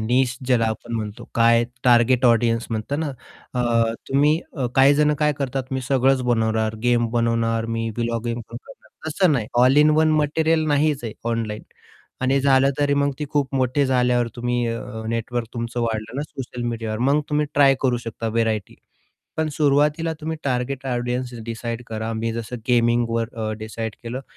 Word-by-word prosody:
Niche 125 +2 +1
ज्याला 120 -3 +3
आपण 120 +1 -7
म्हणतो, 105 -2 -5
काय 115 0 +4 0.2
टार्गेट 125 +1 +4
ऑडियन्स 115 0 +2
म्हणतात 115 +7 -2
ना? 160 - -1 0.5
अ, 115 -2 +2 0.2
तुम्ही 145 +3 +3 0.2
अ, 130 - 0
काही 135 +2 +6
जणं 150 +1 +3
काय 150 0 +3
करतात? 135 -1 -2
मी 130 - -1
सगळंच 135 0 +3
बनवणार, 110 -1 0
गेम 120 -1 +2
बनवणार, 115 -1 0
मी 115 0 -2
व्हीलॉग 115 -1 -1
पण 115 -1 -1 0.2
बनवणार, 120 - -12 0.2
तसं 170 +2 +2
नाही 120 -7 0 0.2
ऑल 130 +2 +5
इन 150 +1 +5
वन 155 0 +4
मटेरियल 160 +2 +2
नाहीच 145 -2 +1
आहे 110 - -4 0.2
ऑनलाईन, 110 -2 -3 0.6
आणि 135 +1 +2
झालं 135 0 +4
तरी 145 -1 +2
मग 140 0 +1
ती 150 - -2
खूप 140 -2 0
मोठे 130 +2 +1
झाल्यावर 125 -2 +2
तुम्ही 120 0 -1
अ, 115 0 -5
नेटवर्क 115 +1 -2
तुमचं 115 0 -3
वाढलं 115 0 -3
ना, 140 - -1
सोशल 130 -4 -7
मीडियावर, 115 -2 -3
मग 150 +2 +3
तुम्ही 150 0 +1
ट्राय 140 -1 +6
करू 125 -2 +2
शकता 115 0 -4
व्हरायटी. 110 -3 -1 0.6
पण 160 - +1
सुरुवातीला 150 +2 +2
तुम्ही 160 +1 -3
टार्गेट 130 0 -2
ऑडियन्सेस 125 -1 -2
डिसाईड 115 +1 -5
करा. 110 0 -4
मी 115 +1 -2
जसं 115 +1 -5
गेमिंगवर 120 -1 +2
अ, 110 -1 -3
डिसाईड 110 0 -5
केलं. 120 +3 -5
120 Hz, 170 wpm, -22 LUFS, 115-140 Hz, 0.6 s, काही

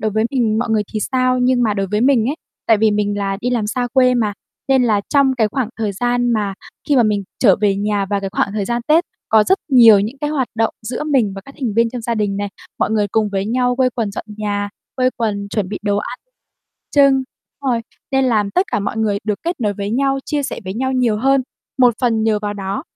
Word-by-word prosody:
đối 215 0 0
với 220 +1 0
mình 230 -5 +1
mọi 240 0 -1
người 220 -1 +2
thì 215 - -2
sao, 255 +2 +1
nhưng 250 0 +2
mà 215 -3 +1
đối 195 -1 -1
với 210 +3 -1
mình 245 -3 +3
ấy, - - -2 0.3
tại 225 - +5
vì 220 0 +3
mình 205 0 0
là 195 -1 -1
đi 245 - -1
làm 235 -4 0
xa 245 +3 -2
quê 255 -1 +4
mà, 220 -4 +1 0.4
nên 265 -1 +4
là 215 -4 +2
trong 280 -2 +3
cái 220 -2 +3
khoảng 255 0 -2
thời 215 -2 -1
gian 245 +3 0
mà 205 -3 -1 0.3
khi 290 - +3
mà 245 - +6
mình 210 -2 0
trở 200 -7 +5
về 200 -2 +2
nhà 205 0 -1
vào 200 0 -1
cái 195 -1 -4
khoảng 200 - 0
thời 210 -1 -2
gian 235 +3 -2
Tết 325 +3 +4 0.2
có 215 -1 +5
rất 380 - +3
nhiều 230 -7 +7
những 220 +7 -4
cái 295 +1 -2
hoạt 270 -5 -1
động 225 0 0
giữa 240 +6 -4
mình 260 -9 +1
và 195 - -7
các 275 - -13
thành 235 -6 -1
viên 230 +1 +2
trong 245 -1 -6
gia 235 +1 -1
đình 205 -2 -1
này, 205 0 -2 0.3
mọi - - +1
người 215 -2 +1
cùng 215 +1 +1
với 195 -1 -2
nhau 250 +2 +1
quây 255 -1 +2
quần 225 -4 -2
dọn 200 - -6
nhà, 205 -1 -2 0.3
quây 255 -1 +2
quần 205 -4 -2
chuẩn 200 -3 -1
bị 205 - -4
đồ 205 -1 0
ăn 250 - -5 0.7
chưng, 275 -2 +4 0.4
rồi, 240 -3 +1 0.3
nên 270 0 +3
làm 215 -5 +1
tất 365 - +1
cả - - +1
mọi 200 - -3
người 210 -2 +1
được 210 -1 -2
kết 340 -3 -3
nối 210 -3 0
với 200 +1 -4
nhau, 270 +3 +1
chia 295 -2 -1
sẻ - - -4
với 190 +1 -5
nhau 260 +3 -1
nhiều 245 -4 +1
hơn. 270 +4 +2 0.4
Một 245 -2 +5
phần 230 -3 +1
nhờ 220 -1 +2
vào 205 0 -2
đó 195 -1 -4
225 Hz, 255 wpm, -18 LUFS, 205-255 Hz, 0.7 s, nhiều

